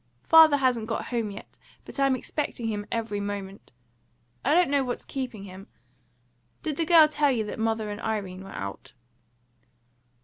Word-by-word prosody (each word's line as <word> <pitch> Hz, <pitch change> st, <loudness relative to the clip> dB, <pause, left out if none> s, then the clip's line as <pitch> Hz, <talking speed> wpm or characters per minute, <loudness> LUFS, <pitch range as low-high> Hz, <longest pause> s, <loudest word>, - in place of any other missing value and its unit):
Father 320 Hz, -3 st, +7 dB
hasn't 250 Hz, -5 st, +1 dB
got 225 Hz, -, -3 dB
home 230 Hz, -4 st, -1 dB
yet, 200 Hz, -, -11 dB, 0.3 s
but -, -, -9 dB
I'm 275 Hz, -1 st, +3 dB
expecting 255 Hz, -2 st, -4 dB
him 210 Hz, -2 st, -3 dB
every 225 Hz, -3 st, -2 dB
moment; 200 Hz, -1 st, -6 dB, 0.7 s
I 290 Hz, +4 st, +3 dB
don't 350 Hz, -5 st, +4 dB
know 280 Hz, -1 st, +3 dB
what's 245 Hz, -1 st, -4 dB
keeping 250 Hz, -7 st, -5 dB
him. 195 Hz, 0 st, -11 dB, 1.0 s
Did 305 Hz, -3 st, -3 dB
the 330 Hz, -, 0 dB
girl 325 Hz, -2 st, +8 dB
tell 295 Hz, -2 st, +2 dB
you 225 Hz, -4 st, 0 dB
that 210 Hz, -, -6 dB
mother 220 Hz, -1 st, -1 dB
and 205 Hz, -, -6 dB
Irene 195 Hz, -4 st, -3 dB
were 195 Hz, -, -11 dB
out?" 100 Hz, -, -7 dB
225 Hz, 165 wpm, -26 LUFS, 205-275 Hz, 1.0 s, girl